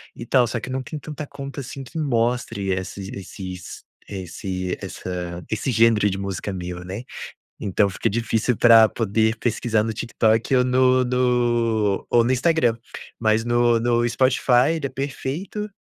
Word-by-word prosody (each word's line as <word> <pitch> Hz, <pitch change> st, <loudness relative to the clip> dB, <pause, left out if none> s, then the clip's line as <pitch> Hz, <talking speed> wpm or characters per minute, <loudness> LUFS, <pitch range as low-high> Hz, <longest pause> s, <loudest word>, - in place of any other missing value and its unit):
e 115 Hz, -, -8 dB
tal 125 Hz, 0 st, +3 dB
só 120 Hz, 0 st, -3 dB
que -, -, -8 dB
eu -, -, -4 dB
não 130 Hz, -, -1 dB
tenho 150 Hz, +2 st, -7 dB
tanta 150 Hz, 0 st, -7 dB
conta 140 Hz, 0 st, -8 dB
assim 135 Hz, +1 st, -7 dB
que 125 Hz, +5 st, -10 dB
mostre 115 Hz, -6 st, 0 dB
esses 95 Hz, +1 st, -5 dB
esses 95 Hz, -2 st, -8 dB, 0.3 s
esse 95 Hz, -1 st, -4 dB
essa 90 Hz, -1 st, -5 dB
esse 110 Hz, +4 st, -1 dB
gênero 115 Hz, -3 st, +4 dB
de 95 Hz, -, -3 dB
música 100 Hz, 0 st, -4 dB
meu, 90 Hz, -1 st, -6 dB
né. 95 Hz, +6 st, -6 dB, 0.6 s
Então 100 Hz, +1 st, +1 dB
fica -, -, -1 dB
difícil 115 Hz, +1 st, 0 dB
para 115 Hz, -2 st, +7 dB
poder 110 Hz, +1 st, 0 dB
pesquisar 115 Hz, -2 st, 0 dB
no 115 Hz, -, -2 dB
TikTok 115 Hz, +2 st, +1 dB
ou 125 Hz, -, +4 dB
no 130 Hz, 0 st, +3 dB
no 120 Hz, -4 st, +1 dB
ou 120 Hz, -1 st, +4 dB
no 125 Hz, -, +2 dB
Instagram. 130 Hz, -3 st, +2 dB, 0.4 s
Mas 110 Hz, 0 st, +2 dB
no 120 Hz, 0 st, +3 dB
no 120 Hz, 0 st, +1 dB
Spotify 130 Hz, +2 st, +3 dB
ele 150 Hz, -4 st, -3 dB
é -, -, -3 dB
perfeito, 145 Hz, -, -4 dB
115 Hz, 165 wpm, -22 LUFS, 105-130 Hz, 0.6 s, para